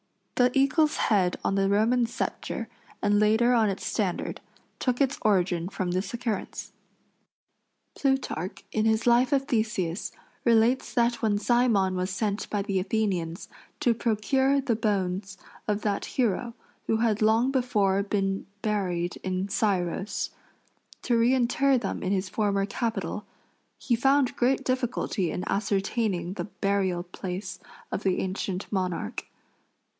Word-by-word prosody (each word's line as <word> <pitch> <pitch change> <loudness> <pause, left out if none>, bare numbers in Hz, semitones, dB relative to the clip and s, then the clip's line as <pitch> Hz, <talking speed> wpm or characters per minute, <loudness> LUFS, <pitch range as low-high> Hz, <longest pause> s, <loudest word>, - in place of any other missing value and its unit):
The 250 0 +4
eagle's 300 +3 +3
head 185 -4 +2
on - - +1
the 195 0 +2
Roman 230 +4 +3
sceptre, 235 - -4 0.4
and 205 0 +3
later 220 +4 +4
on 225 -3 +4
its 195 - -4
standard, 195 -6 -2 0.4
took 250 -2 0
its 275 -1 +1
origin 180 -4 +1
from 185 -2 -2
this 185 +3 -2
occurrence. 230 -4 -4 1.2
Plutarch, 270 - -1
in 220 0 +1
his 220 0 +2
life 245 +3 +4
of 275 -1 +2
Theseus, 215 - -1 0.3
relates 235 +2 +3
that 235 0 +2
when 215 -3 +2
Cymon 220 -4 +2
was 185 +1 -1
sent 205 +1 -2
by 205 -1 -1
the 195 -2 0
Athenians 185 -4 -1 0.3
to 240 - +4
procure 265 +5 +1
the 260 -4 0
bones 195 -3 -1 0.3
of 210 0 -1
that 205 -2 0
hero, 235 -1 -1 0.3
who 225 - +2
had 220 -2 +1
long 225 +4 +3
before 210 -7 +2
been 195 -1 -1 0.2
buried 180 -5 -1
in 185 +1 -2
Scyros, 190 -1 -1 0.7
to 240 - +2
reinter 255 +3 +3
them 245 - -3
in 185 - -1
his 190 -1 0
former 200 -1 +1
capital, 210 -2 -3 0.5
he 240 - 0
found 270 +2 +3
great 265 +2 +2
difficulty 245 -7 -1
in 180 - -3
ascertaining 195 -3 -1
the - - -4
burial 195 -2 -1
place 185 +2 -6 0.3
of - - -2
the 190 -3 +1
ancient 190 0 -3
monarch. 185 - -2
210 Hz, 135 wpm, -27 LUFS, 190-240 Hz, 1.2 s, The